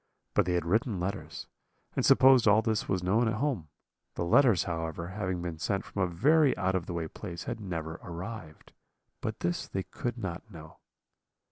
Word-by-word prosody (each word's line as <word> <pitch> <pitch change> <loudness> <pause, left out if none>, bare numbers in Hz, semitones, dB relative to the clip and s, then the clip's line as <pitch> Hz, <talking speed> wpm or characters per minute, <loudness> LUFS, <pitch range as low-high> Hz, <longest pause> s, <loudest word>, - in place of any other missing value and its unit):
But - - +3
they 90 - +1
had 85 -1 0
written 110 - +1
letters, 100 +3 -4 0.5
and - - +1
supposed 130 -3 +6
all 105 +2 +5
this 110 -1 -1
was 95 -2 0
known 110 +6 +3
at 110 - 0
home. 115 - -1 0.5
The 85 - -1
letters, 115 - +5
however, 80 0 -4
having 95 -3 -3
been 85 -3 -5
sent 95 +3 -1
from 100 - -4
a 95 - +3
very 140 - +3
out 95 0 +1
of 95 -2 -1
the 90 - -4
way 85 -2 -2
place, 85 +1 -7
had - - -4
never 80 -5 -5
arrived, 85 -2 -8 0.5
but - - -4
this 85 0 -1
they 95 - -3
could 120 +4 -4
not 95 -1 -5
know. 80 -5 -12
95 Hz, 190 wpm, -30 LUFS, 85-110 Hz, 0.5 s, supposed